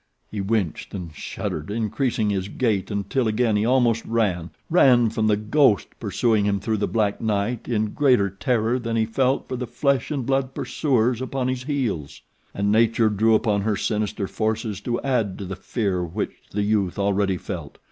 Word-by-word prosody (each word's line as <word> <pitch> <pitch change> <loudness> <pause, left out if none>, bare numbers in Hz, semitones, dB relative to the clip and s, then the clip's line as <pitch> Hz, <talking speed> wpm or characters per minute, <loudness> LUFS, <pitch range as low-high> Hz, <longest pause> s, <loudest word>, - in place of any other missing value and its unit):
He 105 - -3
winced 100 -4 -2
and 85 -5 -6
shuddered, 75 +1 -5
increasing 110 0 0
his 95 -1 -1
gait 105 -3 0
until 105 +5 -1
again 110 0 +1
he 105 +1 +1
almost 120 -3 +3
ran 95 -7 0 0.2
ran 125 -9 +5
from 110 -1 0
the 105 -1 +3
ghost 110 +1 +3
pursuing 110 -4 +1
him 100 -1 +1
through 110 +2 -1
the 105 - 0
black 105 -3 0
night 110 +2 -1
in 110 -3 0
greater 130 -9 +3
terror 115 +4 0
than 115 -1 -3
he 110 -1 +2
felt 130 +4 0
for 130 - -3
the 125 0 -4
flesh 140 0 0
and 140 -5 -2
blood 135 0 0
pursuers 125 -4 0
upon 130 0 -2
his 130 0 -3
heels. 120 - -2 0.3
And 100 +1 0
Nature 115 0 +3
drew 110 +2 +3
upon 105 -2 +1
her 105 0 0
sinister 105 -1 -1
forces 110 -1 -2
to 120 +2 -2
add 115 -8 0
to 100 - -6
the 95 +1 -5
fear 95 -2 -2
which 85 0 -3 0.2
the 105 +1 -1
youth 100 -3 0
already 100 -1 +1
felt. - - -7
110 Hz, 180 wpm, -23 LUFS, 100-125 Hz, 0.3 s, ran